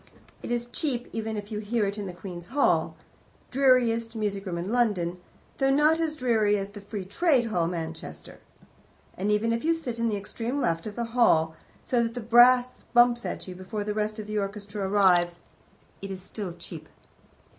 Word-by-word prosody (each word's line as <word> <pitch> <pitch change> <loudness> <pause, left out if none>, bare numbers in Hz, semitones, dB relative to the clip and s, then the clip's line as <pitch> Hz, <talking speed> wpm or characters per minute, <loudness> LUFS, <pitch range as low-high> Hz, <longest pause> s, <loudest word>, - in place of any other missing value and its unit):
It - - -7
is 240 0 -1
cheap, 250 -4 -1
even 220 -1 -3
if 205 +1 -7
you 210 - -2
hear 215 +1 0
it 200 +1 -3
in 200 - -4
the - - -5
Queen's 175 -1 -8
Hall, 280 +6 +2 0.6
dreariest 240 -4 +3
music 200 -2 -2
room 175 -2 -3
in 180 +4 -3
London, 185 -8 +1 0.4
though 270 -1 +3
not 300 +4 +4
as 320 -2 0
dreary 220 -6 +2
as 195 0 -4
the 205 0 -10
Free 200 -1 -6
Trade 255 - +2
Hall, 170 -4 +1
Manchester; 160 - -6 0.8
and 200 +3 -1
even 220 +2 +2
if 230 - -2
you 330 +1 +3
sit 245 -8 -5
on 230 0 +1
the 210 - -1
extreme 230 +6 -4
left 165 -5 0
of 210 - -7
that 235 - -2
hall, 160 -10 +3 0.3
so 245 -2 +1
that 230 0 -2
the - - -3
brass 245 +2 +5
bumps 240 0 +5
at - - -5
you 185 - -6
before 185 +3 -5
the 210 0 -2
rest 215 +1 -2
of 215 - -6
the 210 0 -2
orchestra 200 0 -4
arrives, 175 -4 +3 0.6
it 195 - -6
is 190 -1 -5
still 195 -2 -6
cheap. - - -10
215 Hz, 195 wpm, -27 LUFS, 195-240 Hz, 0.8 s, brass